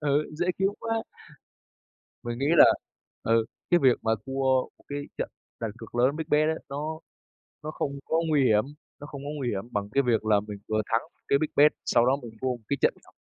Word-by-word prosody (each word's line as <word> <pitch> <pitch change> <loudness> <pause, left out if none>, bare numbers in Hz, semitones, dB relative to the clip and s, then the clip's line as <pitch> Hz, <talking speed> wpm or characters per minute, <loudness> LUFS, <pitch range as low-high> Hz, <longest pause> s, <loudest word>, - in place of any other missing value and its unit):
ừ, 145 0 +1
dễ 175 +3 -1
kiếm 195 0 +3
quá. 225 0 -1 1.2
Mình 120 0 -4
nghĩ 140 - 0
là, - - +10 0.6
ừ, 115 0 +3 0.3
cái 175 - +5
việc 130 -3 +5
mà 110 - +1
thua 135 0 -2 0.4
một - - -24
cái 145 - -3 0.2
trận - - -1 0.3
đặt 115 - -1
cược 115 - -11
lớn, 125 +4 +3
big 160 - -3
bet 150 +1 +3
ấy, 160 - 0
nó 155 +3 -4 0.6
nó 155 - -4
không 140 -2 -3
có 160 - 0
nguy 145 -3 +3
hiểm, 110 -3 +4 0.4
nó 145 - -7
không 140 -2 -8
có 145 - -5
nguy 135 -4 -2
hiểm 100 -4 -2
bằng 100 0 -2
cái 140 - +4
việc 120 -4 +1
là 105 -2 +4
mình 105 0 -8
vừa 110 0 +1
thắng 115 - +3
một - - -41
cái 140 - +4
big 155 - 0
bet 150 +1 +7
sau 120 - +3
đó 130 +2 +4
mình 120 - -8
thua 130 - 0
một 125 -1 -2
cái 140 - +1
trận - - +4
nhỏ. - - -19
135 Hz, 230 wpm, -27 LUFS, 115-150 Hz, 1.2 s, là